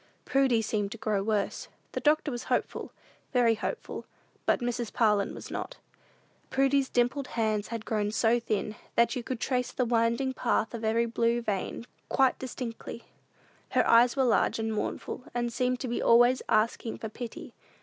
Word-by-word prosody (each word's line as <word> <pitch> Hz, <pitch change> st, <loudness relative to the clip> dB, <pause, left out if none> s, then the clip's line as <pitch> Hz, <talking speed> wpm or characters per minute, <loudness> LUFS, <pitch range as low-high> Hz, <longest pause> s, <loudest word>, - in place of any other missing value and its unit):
Prudy 265 Hz, -4 st, +3 dB
seemed 205 Hz, -2 st, -1 dB
to -, -, -9 dB
grow 215 Hz, -2 st, 0 dB
worse. 210 Hz, -1 st, -1 dB, 0.2 s
The -, -, -2 dB
doctor 305 Hz, 0 st, +2 dB
was 240 Hz, 0 st, -5 dB
hopeful, -, -, -1 dB, 0.4 s
very 240 Hz, -3 st, +4 dB
hopeful; 215 Hz, -, -4 dB, 0.4 s
but -, -, +3 dB
Mrs. 240 Hz, -2 st, -2 dB
Parlin 210 Hz, -4 st, +2 dB
was -, -, -9 dB
not. -, -, -5 dB, 0.7 s
Prudy's 270 Hz, 0 st, +2 dB
dimpled 250 Hz, +3 st, +1 dB
hands 215 Hz, -3 st, -1 dB
had 230 Hz, -2 st, -5 dB
grown 210 Hz, -2 st, 0 dB
so 225 Hz, +2 st, +3 dB
thin, 215 Hz, -2 st, -2 dB, 0.2 s
that 235 Hz, +2 st, +3 dB
you 250 Hz, -, -2 dB
could 245 Hz, 0 st, -4 dB
trace 250 Hz, -1 st, -1 dB
the 250 Hz, -, 0 dB
winding 235 Hz, +3 st, +1 dB
path 225 Hz, -2 st, 0 dB
of 230 Hz, -1 st, -5 dB
every 225 Hz, +2 st, +2 dB
blue 235 Hz, 0 st, +1 dB
vein 210 Hz, 0 st, -3 dB, 0.2 s
quite 265 Hz, -1 st, +3 dB
distinctly. 240 Hz, -2 st, -6 dB, 0.7 s
Her -, -, +3 dB
eyes 240 Hz, +1 st, +6 dB
were 270 Hz, -, +2 dB
large 245 Hz, -, +2 dB
and 225 Hz, 0 st, -2 dB
mournful, 215 Hz, +3 st, -4 dB
and 240 Hz, -1 st, -1 dB
seemed 250 Hz, 0 st, 0 dB
to 260 Hz, -, -2 dB
be 240 Hz, -, -2 dB
always 240 Hz, +2 st, +5 dB
asking 225 Hz, +1 st, +1 dB
for 220 Hz, -, -5 dB
pity. 235 Hz, +2 st, -8 dB
235 Hz, 170 wpm, -29 LUFS, 220-250 Hz, 0.7 s, eyes